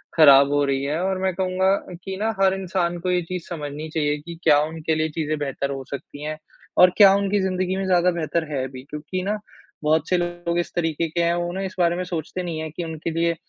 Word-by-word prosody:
ख़राब 140 -3 +7
हो 145 0 +2
रही 135 -1 0
है 150 +4 -1
और 190 0 0
मैं 190 -1 +1
कहूँगा 190 +1 +2 0.3
कि 190 - -4
ना 220 +2 0
हर 190 -1 +5
इंसान 185 -2 -1
को 185 - -2
ये 180 - +2
चीज़ 175 0 -6
समझनी 150 -1 -5
चाहिए 150 -2 0
कि 170 +2 -8
क्या 150 -2 +6
उनके 160 0 -2
लिए 155 0 0
चीज़ें 155 0 -2
बेहतर 140 -1 -2
हो 135 -1 -4
सकती 145 +1 -7
हैं 155 0 -4 0.4
और 180 - +8
क्या 200 -2 +8
उनकी 200 0 +1
ज़िंदगी 185 0 -1
में 195 0 -2
ज़्यादा 180 -1 +3
बेहतर 160 -1 -2
है 135 -3 -1
अभी 130 -1 -10
क्योंकि 150 +5 -4
ना, 210 +2 -1 0.4
बहुत 155 0 +2
से 180 - +3
लोग 175 0 -2
इस 175 - -3
तरीके 165 -1 0
के 170 +2 -1
हैं, 170 - +2
वो 175 0 -2
ना 190 - -3
इस 190 -1 -5
बारे 170 -1 +3
में 180 - -2
सोचते 180 +1 -4
नहीं 165 -2 -4
हैं 160 -1 -5
कि 175 - -5
उनके 160 0 -4
लिए 170 0 +2
170 Hz, 240 wpm, -23 LUFS, 150-185 Hz, 0.4 s, और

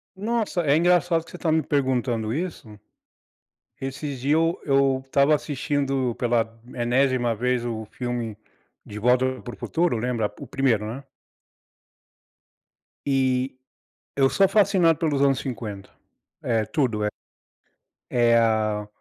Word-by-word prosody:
Nossa, 215 -2 -1
é 140 -1 +3
engraçado 175 0 +3
que - - -15
você 180 - -8
tá 160 - 0
me 160 0 +2
perguntando 125 -5 0
isso, 145 - -5 1.0
esses 135 0 -5
dias 140 +4 +1
eu 165 +1 +1
eu 135 -2 +2
estava 140 +2 +3
assistindo 135 -2 -1
pela 115 -2 -1
enésima 120 0 +1
vez 125 +2 0
o 115 -2 -4
filme 120 -3 -4 0.5
de 105 - -8
Volta 125 +3 +2
Para 120 - -7
o - - -14
Futuro, 170 -6 0
lembra? 115 -2 -1
O - - -7
primeiro, 125 -6 +1
né. 120 +6 -6 2.0
E 130 -1 +1 0.6
eu 135 -1 +4
sou 195 -1 +4
fascinado 190 -6 +3
pelos 150 -4 0
anos 135 -1 +3
50 110 -7 -6 0.5
é 115 -2 0
tudo, 115 -5 0
é - - +2 1.0
é 120 -1 +4
a 110 -2 +1
130 Hz, 130 wpm, -24 LUFS, 115-145 Hz, 2.0 s, eu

